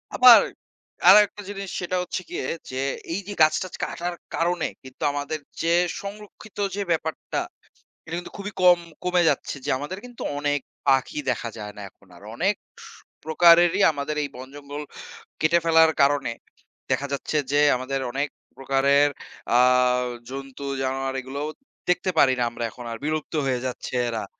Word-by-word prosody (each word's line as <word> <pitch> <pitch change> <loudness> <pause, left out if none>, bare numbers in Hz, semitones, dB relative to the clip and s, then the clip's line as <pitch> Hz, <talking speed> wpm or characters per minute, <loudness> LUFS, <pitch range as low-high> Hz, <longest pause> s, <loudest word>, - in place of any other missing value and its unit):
আবার 250 -2 +9 0.7
আরেকটা 210 0 +7
জিনিস 195 -1 -6
সেটা 180 +1 -2
হচ্ছে 185 - -4
গিয়ে - - -4 0.2
যে, 130 - -7 0.4
এই 180 - -1
যে 205 - -4
গাছ-টাছ 155 +4 +3
কাটার 175 0 -3 0.2
কারণে 175 0 0 0.2
কিন্তু 130 +3 -10
আমাদের 145 +2 -3 0.2
যে 165 +1 +2 0.3
সংরক্ষিত 210 +1 -10 0.2
যে 205 - -2
ব্যাপারটা, 160 -1 -2 0.7
এটা 165 +1 -5
কিন্তু 175 - -10
খুবই 205 +1 -5
কম 180 -1 +7 0.2
কমে 180 0 +2
যাচ্ছে - - -2
যে - - -2
আমাদের 150 +7 -5
কিন্তু 245 -1 -12 0.2
অনেক 145 0 0 0.3
পাখি 135 +2 +2
দেখা 115 - -1
যায় 105 -1 -6
না 105 - -7
এখন 100 - -27
আর। 100 - -16
অনেক 195 - +1 0.7
প্রকারেরই 170 +3 +5
আমাদের 150 +1 -4
এই - - -2
বন-জঙ্গল 140 +3 -8 0.6
কেটে 165 +2 +4
ফেলার 160 -1 +6
কারণে 140 -3 +2 0.6
দেখা 140 - 0
যাচ্ছে 145 +2 -2
যে 145 - +3 0.2
আমাদের 130 +2 -3
অনেক 140 +3 -1 0.3
প্রকারের 140 +2 +3 0.5
আ - - +6 0.7
জন্তু-জানোয়ার 135 0 -4
এগুলোও 140 +4 -5 0.4
দেখতে 180 +1 +2
পারি 130 -2 +6
না 120 - +2
আমরা 120 - -5
এখন 120 - -10
আর; 115 - -5
বিলুপ্ত 155 +1 -2
হয়ে 130 -2 0
যাচ্ছে 125 0 -5
এরা। 115 -1 -3
150 Hz, 150 wpm, -24 LUFS, 135-175 Hz, 0.7 s, আবার